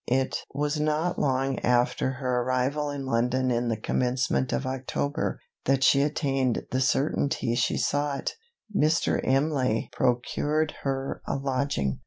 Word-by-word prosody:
It 130 +1 +1 0.2
was 150 +1 -1
not 155 +3 0
long 135 -1 +1
after 125 +1 +1
her 130 -2 -1
arrival 130 +4 0
in 140 -1 -4
London 125 +1 +1
in 120 0 0
the 115 -1 0
commencement 125 +3 0
of 135 - -1
October, 130 +2 -2 0.3
that 135 -1 +2
she 140 - +5
attained 135 -4 0
the 130 - +1
certainty 135 -2 +1
she 120 - +1
sought. 145 -1 -1 0.4
Mr. 155 -1 +2
Imlay 135 -4 +1
procured 145 +5 0
her 135 0 -2
a - - -1
lodging. 135 - -1
135 Hz, 135 wpm, -27 LUFS, 125-145 Hz, 0.4 s, she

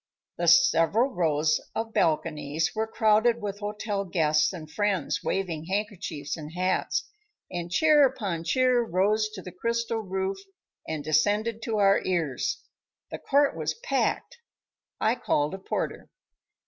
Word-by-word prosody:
The - - 0
several 250 - +4
rows 155 -4 +1
of 225 0 -3
balconies 160 -3 0
were 220 0 -1
crowded 220 +2 +3
with 205 -2 -5
hotel 210 -1 -3
guests 155 -4 +2
and 165 -5 -8
friends 195 -2 -1
waving 170 -5 -2
handkerchiefs 190 -6 -3
and 155 -1 -9
hats, 185 +1 -1 0.4
and 175 -1 -4
cheer 300 - +5
upon 200 -10 -4
cheer 250 +7 +3
rose 215 +2 +1
to - - -8
the 180 - -8
crystal 230 +4 -2
roof 190 -1 -3 0.5
and 155 -2 -4
descended 205 +9 +1
to 225 -2 -1
our 200 -1 +4
ears. 165 -8 -1 0.5
The - - -5
court 285 0 +2
was - - -2
packed. - - -2 0.6
I 220 - +2
called 150 -9 0
a 190 - -5
porter. 190 - -4
195 Hz, 135 wpm, -27 LUFS, 165-225 Hz, 0.6 s, cheer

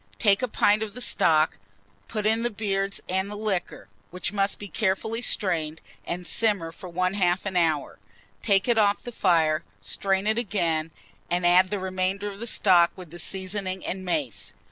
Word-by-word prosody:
Take 200 +1 +3
a 255 - 0
pint 210 -2 +2
of 215 -1 -4
the - - -6
stock, 160 -9 +3 0.5
put 215 -2 -3
in 220 +1 +2
the 240 - 0
beards 200 -2 -1
and 190 +2 -1
the 210 - -6
liquor, 205 -4 -3 0.2
which 180 +2 -3
must 200 0 0
be 205 - -8
carefully 220 +4 -1
strained, 165 -9 -1 0.3
and 180 +1 -4
simmer 200 -5 +1
for 180 +2 -10
1/2 185 +1 +1
an 195 -2 -3
hour. 160 -4 +1 0.4
Take 200 -1 +2
it 235 -2 +3
off 205 -1 +2
the 245 - -6
fire, 165 -7 +2 0.2
strain 190 - -1
it 220 +2 +2
again, 170 -8 0 0.4
and 175 0 0
add 180 +2 +5
the 205 - -1
remainder 190 +2 -2
of 200 - -11
the 235 - -4
stock 180 -6 +5
with 180 -4 -11
the 175 - -8
seasoning 190 +1 -3
and 185 +1 -4
mace. 130 - -3
190 Hz, 180 wpm, -26 LUFS, 175-205 Hz, 0.5 s, add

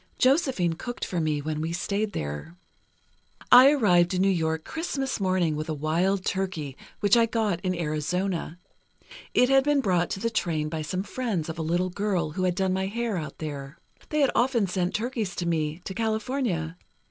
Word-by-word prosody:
Josephine 260 - +2
cooked 240 +9 -5
for 175 -2 -2
me 150 -2 -1
when 155 0 -2
we 160 +1 -2
stayed 205 +4 -1
there. 75 - -5 1.0
"I 255 +2 +10
arrived 185 -10 +3
in 185 - +2
New 195 - +4
York 160 -3 -1
Christmas 280 -6 -3
morning, 185 -5 +1
with 155 +2 -4
a 155 - -1
wild 175 +6 0
turkey, 175 -8 -2 0.3
which 205 0 +5
I 230 -1 +4
got 215 -6 0
in 185 -1 -1
Arizona. 170 +2 -2 0.8
It 250 - +5
had 270 0 +5
been 295 0 +3
brought 180 -8 +1
to - - -3
the 230 +3 -1
train 160 -8 -1
by 160 0 -3
some 185 +5 -3
friends 210 -9 -3
of 160 +1 -5
a - - 0
little 175 +3 0
girl 185 -5 -1
who 185 +4 -1
had 180 -1 +1
done 190 -1 +1
my 190 0 -1
hair 230 +1 -2
out 150 -5 -5
there. 140 -2 -6 0.3
They 305 -1 +1
had 275 - +4
often 240 -4 +2
sent 180 -1 -1
turkeys 220 -5 -2
to 175 - -3
me, 160 -1 -1
to 190 - -4
California. 220 - -1
185 Hz, 190 wpm, -26 LUFS, 160-220 Hz, 1.0 s, I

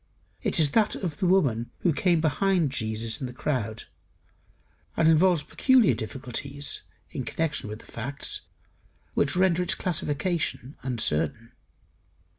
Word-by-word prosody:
It - - +1
is 150 -3 +4
that 220 -2 +3
of 170 -6 -4
the 185 - +1
woman 135 -11 +2
who 175 - +3
came 170 +1 +2
behind 165 -1 +2
Jesus 110 -2 -2
in 130 - -2
the - - -7
crowd; 115 -5 -2 1.1
and 160 - +4
involves 165 0 +4
peculiar 255 - +4
difficulties, 130 +5 -4 0.3
in - - -4
connection 155 -9 -2
with 105 - -5
the - - -16
facts 135 +5 -5 0.7
which 140 - +2
render 180 -1 +3
its 180 - +2
classification 165 -4 -1
uncertain. 115 - 0
145 Hz, 130 wpm, -27 LUFS, 120-175 Hz, 1.1 s, is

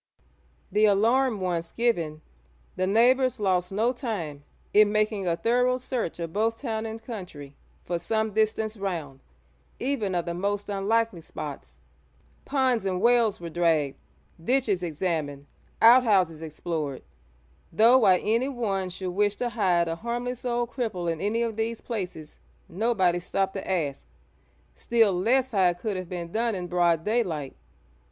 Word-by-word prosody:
The 210 +1 +4
alarm 225 +2 +3
once 170 -2 -2
given, 170 -10 -1 0.5
the 185 - 0
neighbours 250 +5 +3
lost 185 -3 +1
no 225 +5 +1
time 185 - -5 0.3
in 210 0 +6
making 215 -2 0
a 170 - +2
thorough 250 +5 +2
search 250 -7 -3
of 165 -1 -5
both 225 +2 0
town 225 -4 -3
and 220 0 -6
country 180 - -9 0.3
for 175 -1 -2
some 220 +2 -1
distance 220 0 0
round, 170 -9 -4 0.6
even 235 -8 -1
of 175 - -1
the 170 - -3
most 200 +3 -2
unlikely 205 -1 0
spots. 135 - -8 0.6
Ponds 260 -5 +1
and 185 -2 -1
wells 235 -1 +3
were 170 -1 -7
dragged, 160 -5 +1 0.4
ditches 230 -4 +1
examined, 155 -4 -3 0.4
outhouses 205 -9 +5
explored; 155 -3 -4 0.7
though 230 +8 +6
why 190 -6 +5
anyone 225 -4 -1
should 180 0 -5
wish 205 +2 +1
to 245 - -2
hide 185 -7 +1
a 165 0 -3
harmless 240 +3 -4
old 240 -1 -1
cripple 185 -9 -2
in 160 - -8
any 220 +4 0
of 225 -2 -3
these 225 +1 -2
places, 180 -9 -6 0.3
nobody 190 -3 +1
stopped 190 +2 -1
to 195 - -6
ask, 150 -7 -2 0.7
still 225 -4 +2
less 250 +8 +2
how 190 -4 +4
it 175 - -3
could 205 +3 -3
have 185 -2 -5
been 170 -2 -5
done 230 +1 0
in 180 -1 -4
broad 175 -2 +2
daylight. 180 - -1
200 Hz, 145 wpm, -26 LUFS, 175-230 Hz, 0.7 s, in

